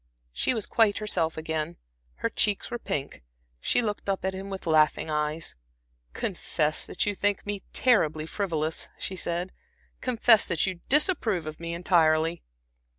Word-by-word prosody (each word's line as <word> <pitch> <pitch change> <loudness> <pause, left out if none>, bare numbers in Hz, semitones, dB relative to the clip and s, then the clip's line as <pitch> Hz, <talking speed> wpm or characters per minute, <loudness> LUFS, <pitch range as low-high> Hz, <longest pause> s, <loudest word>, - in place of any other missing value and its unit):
She 250 - +1
was 220 - 0
quite 220 -3 +3
herself 175 -7 0
again, 160 +1 -3 0.4
her - - -1
cheeks 210 +3 +1
were 240 - -3
pink; 140 - -4 0.4
she 245 - +2
looked 205 -2 -3
up 195 -1 -1
at 190 - 0
him 190 +1 -6
with 195 -1 -6
laughing 155 -1 +3
eyes. 150 +1 -2 0.6
"Confess 155 0 -1
that - - -1
you 205 - 0
think 205 0 0
me 205 -1 -3
terribly 155 -11 +2
frivolous," 160 -4 -2
she 190 - -5
said; 175 +1 -3 0.5
"confess 235 -3 +4
that 170 -3 +2
you 185 -2 -3
disapprove 255 - +3
of 155 0 -7
me 170 0 -4
entirely." 165 -1 +2
175 Hz, 150 wpm, -27 LUFS, 160-205 Hz, 0.6 s, confess